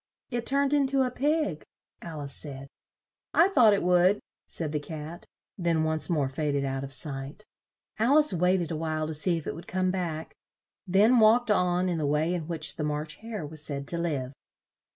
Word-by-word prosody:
"It 240 -1 -2
turned 280 +1 +2
in 285 -2 +3
to 270 0 +2
a 250 - -1
pig," 290 - 0 0.4
Al 160 -3 -7
ice 140 -1 -6
said. 140 -2 -8 0.7
"I 345 +4 +6
thought 245 - +6
it 195 - -2
would," 180 +3 +4 0.3
said 160 -3 -3
the 150 - -1
Cat, 155 +2 -8 0.3
then 170 -2 +1
once 155 -2 0
more 150 -6 +1
fa 145 +3 -2
ded 140 -1 0
out 135 0 -3
of 140 - -7
sight. 140 +7 -4 0.5
Al 250 +7 +4
ice 305 0 +4
wait 180 +1 +2
ed 170 - -4
a - - -1
while 155 0 -2
to 160 - -4
see 170 +3 0
if 160 - -7
it - - -3
would 165 - -10
come 185 0 0
back, 170 -4 -4 0.5
then 210 +7 +5
walked 225 +1 +5
on 180 -2 +2
in 175 -3 -1
the 150 - 0
way 155 +4 +1
in 165 -4 -3
which 160 -2 -1
the 150 - -2
March 150 +1 -3
Hare 220 -6 -6
was 155 0 -7
said 140 -2 -5
to 170 - -2
live. 140 -6 -2
170 Hz, 210 wpm, -28 LUFS, 150-205 Hz, 0.7 s, I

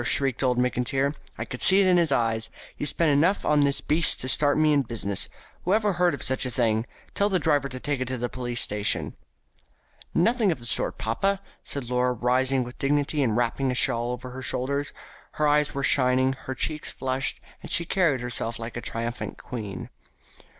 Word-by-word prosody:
shrieked 135 0 +1
old 125 -2 +1
Mr. 125 0 +1
McIntyre. 135 +4 0 0.2
"I - - -4
could 125 - -6
see 190 +1 +6
it 200 - +4
in 180 -1 +4
his 170 -4 +2
eye. 115 -4 +1 0.3
He - - -4
spent 155 +2 +1
enough 165 +8 +2
on 150 -1 +3
this 140 -1 +1
beast 160 +2 +3
to 130 - -2
start 145 +4 +3
me 155 -1 +4
in 145 - +4
business. 110 -5 -2 0.3
Whoever 205 +2 +2
heard 175 -3 +2
of - - -7
such 130 0 +3
a 130 - +1
thing? 115 -1 0 0.3
Tell 200 +1 +1
the 190 - +2
driver 145 -5 +1
to 130 0 -6
take 140 -1 -2
it 130 - -2
to 130 0 -2
the 120 +1 -2
police 120 -1 -2
station." 105 0 0 1.0
"Nothing 220 +3 +2
of 160 - -2
the 120 - -11
sort, 120 - -2
papa," 195 - 0 0.2
said 140 -4 -4
Laura, 125 +1 +1
rising 130 +2 +1
with 125 +1 -10
dignity 145 +1 +1
and 115 -5 +1
wrapping 120 +3 0
a 125 - -1
shawl 120 -1 +2
about 125 +1 -10
her 130 +1 -7
shoulders. 140 +3 -1 0.4
Her 150 - +1
eyes 150 0 +2
were 140 - -2
shining, 130 -1 +3
her 130 0 -7
cheeks 155 +4 -3
flushed, 130 0 -2 0.2
and - - -9
she 170 - 0
carried 165 -8 +1
herself 120 -1 -2
like 115 +1 -7
a 120 - -4
triumphant 115 +1 -4
queen. 105 -6 -7
130 Hz, 205 wpm, -25 LUFS, 120-150 Hz, 1.0 s, see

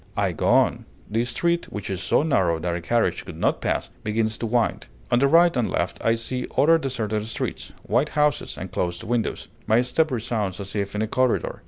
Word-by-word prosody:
I - - +1
go - - -2
on; - - +3 0.3
the 115 +2 +1
street, 170 +7 0
which 105 - -5
is 95 -1 -3
so 100 - +2
narrow 95 - +2
that 85 +2 -2
a 85 - -4
carriage 115 +6 0
could - - -9
not - - 0
pass, - - -1
begins 110 +1 0
to 115 - -2
wind; 120 +1 0 0.2
on 120 - +4
the 140 - +4
right 170 +3 +5
and 120 -3 +1
left 85 - -2
I 115 - +3
see 125 +2 -4
other 165 +3 +5
deserted 110 -7 -2
streets, 115 - -4
white 125 +7 +1
houses, 150 -1 +1
and - - -6
closed 85 +3 -2
windows. 115 0 -2 0.2
My 110 +2 +4
step 155 +6 +1
resounds 110 -6 -2
as 100 0 -6
if 100 0 -2
in 105 - 0
a - - -1
corridor. 130 +2 0
115 Hz, 210 wpm, -24 LUFS, 105-130 Hz, 0.3 s, right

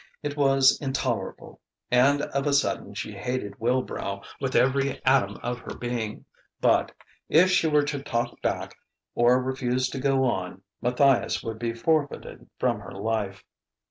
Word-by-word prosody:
It 145 -1 -3
was 135 -2 +4
intolerable! 135 -2 -3 0.3
And 140 +4 +4
of 140 0 -2
a 145 - +2
sudden 140 - 0
she - - -4
hated 125 -5 -4
Wilbrow 115 -5 -1 0.2
with 135 -2 -2
every 135 +1 +2
atom 130 -7 +3
of 120 0 -3
her - - -8
being. 120 -3 -4 0.3
But... - - +3 0.4
if 180 +4 +5
she 180 -3 +3
were 150 -1 +3
to 145 -1 -3
talk 120 -4 -3
back - - -2 0.4
or 120 +2 +4
refuse 130 0 -1
to 135 - -5
go 135 0 +2
on, 95 -6 -2 0.2
Matthias 125 +2 +2
would 110 -1 -5
be 115 0 -2
forfeited 155 +2 -1
from - - 0
her - - -10
life. 100 -1 -3
130 Hz, 150 wpm, -26 LUFS, 120-140 Hz, 0.4 s, if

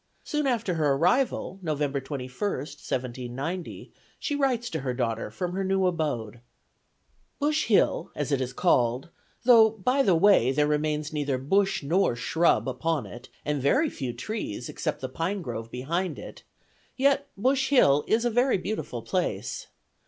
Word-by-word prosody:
Soon 300 -2 -1
after 230 -7 0
her 150 -4 +2
arrival 185 - +1
(November 145 -4 -1
21, 135 -2 -6 0.2
1790), 130 +3 -5 0.3
she 295 - -3
writes 255 -4 0
to 160 - -2
her 130 -3 -3
daughter 115 -4 -2
from 175 +11 -4
her 195 +1 -1
new 190 0 +1
abode: 145 - -2 1.0
"Bush 300 +1 0
Hill, 215 - +2
as 145 0 -3
it 135 -2 +1
is 130 -1 -2
called, 125 -4 +1 0.3
though 230 -3 +7
by 235 +6 0
the 195 -9 +4
way 165 - +5
there 150 +2 +2
remains 150 0 -1
neither 145 -3 -1
bush 195 +8 +1
nor 165 -2 +2
shrub 165 +5 +2
upon 135 +1 -1
it, 120 +7 -11 0.2
and 150 -2 -1
very 275 - +2
few 130 -5 -4
trees, 125 - -5
except - - -3
the 130 - -2
pine 180 +8 -2
grove 115 -4 -5
behind 165 +10 -2
it, - - -10 0.6
yet 280 +1 +2
Bush 265 +5 +1
Hill 150 - +5
is 225 +2 +2
a 240 - +2
very 245 +2 +3
beautiful 210 +4 -4
place. - - -2
160 Hz, 155 wpm, -27 LUFS, 135-215 Hz, 1.0 s, though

